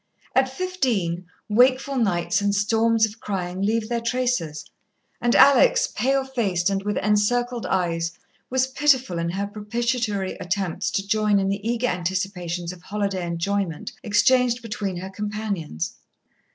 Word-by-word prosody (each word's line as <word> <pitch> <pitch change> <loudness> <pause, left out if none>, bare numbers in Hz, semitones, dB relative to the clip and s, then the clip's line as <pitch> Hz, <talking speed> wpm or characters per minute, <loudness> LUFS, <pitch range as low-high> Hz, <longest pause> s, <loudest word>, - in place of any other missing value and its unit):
At 265 0 +3
fifteen, 245 - -1 0.2
wakeful 255 +5 +3
nights 175 -5 +1
and 200 0 +1
storms 225 +2 +3
of 220 +1 -9
crying 185 -2 -3
leave 215 +2 +1
their 235 0 -1
traces, 230 -11 -1 0.6
and 240 0 +2
Alex, - - +6
pale 270 +1 +2
faced 200 -9 0
and 195 0 0
with 205 +1 -2
encircled 235 +3 +1
eyes, 170 -2 0 0.4
was 260 0 +2
pitiful 260 -9 +2
in 170 0 -1
her 195 +3 -2
propitiatory 210 -1 -2
attempts 180 -1 -2
to 195 0 -2
join 210 -1 +2
in 195 0 +1
the 200 +1 -2
eager 235 +2 0
anticipations 180 -3 -2
of 180 - -14
holiday 200 -1 -2
enjoyment 170 0 -2
exchanged 245 +3 +3
between 205 -4 -3
her 185 +2 -6
companions. 205 - -4
210 Hz, 140 wpm, -24 LUFS, 185-240 Hz, 0.6 s, Alex